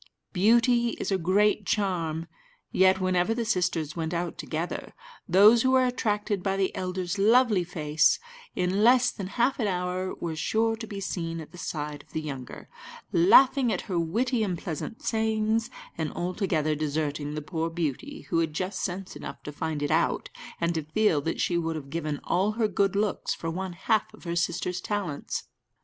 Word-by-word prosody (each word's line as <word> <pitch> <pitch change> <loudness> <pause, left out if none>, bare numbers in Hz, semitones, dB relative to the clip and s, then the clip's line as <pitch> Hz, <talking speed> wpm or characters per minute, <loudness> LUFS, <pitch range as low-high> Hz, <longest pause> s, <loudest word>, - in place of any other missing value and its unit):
Beauty 235 +4 +3
is - - -2
a 195 - +3
great 200 +3 +2
charm; 170 -6 -1 0.5
yet, 190 0 +4
whenever 185 +3 +1
the 235 -1 -1
sisters 175 -7 0
went 165 0 -2
out 170 0 -2
together, 165 +2 -4 0.3
those 210 +6 +7
who 260 - +2
were 260 0 +4
attracted 210 -5 -1
by 195 +1 -1
the 195 -1 0
elder's 185 +1 -3
lovely 220 -2 +4
face, 155 -3 +2 0.4
in 185 +3 +1
less 250 +2 +5
than 195 -3 -6
half 250 +3 +2
an 220 - +1
hour 180 0 -2
were 165 -2 -4
sure 225 +7 +1
to 225 0 -8
be 200 -1 -6
seen 165 -4 -3
at 155 -1 -9
the 180 - -12
side 150 -3 -4
of - - -25
the - - -1
younger, 135 -4 -7 0.4
laughing 275 - +6
at - - -1
her 185 -5 -2
witty 230 +9 0
and 190 -5 -1
pleasant 170 +8 -6
sayings, 220 0 0 0.3
and 160 -1 -1
altogether 175 -4 0
deserting 150 -1 -2
the - - -2
poor 165 +1 -2
beauty, 170 - -3
who 165 - +3
had 160 -2 0
just 185 +5 -3
sense 190 0 -4
enough - - -8
to 150 - -6
find 150 0 -3
it 145 - -1
out, - - +1 0.3
and 170 0 +1
to 160 - -1
feel 155 0 +1
that 165 - -3
she 170 -1 +1
would 165 -1 -2
have 140 -3 -7
given 155 -3 -2
all 195 +4 +1
her 220 0 +1
good 200 -1 +1
looks 205 0 0
for 165 - -4
one 185 +1 -4
half 210 +4 0
of - - -18
her 170 -1 -3
sister's 175 +1 -1
talents. 195 -9 -3
185 Hz, 185 wpm, -27 LUFS, 165-215 Hz, 0.5 s, those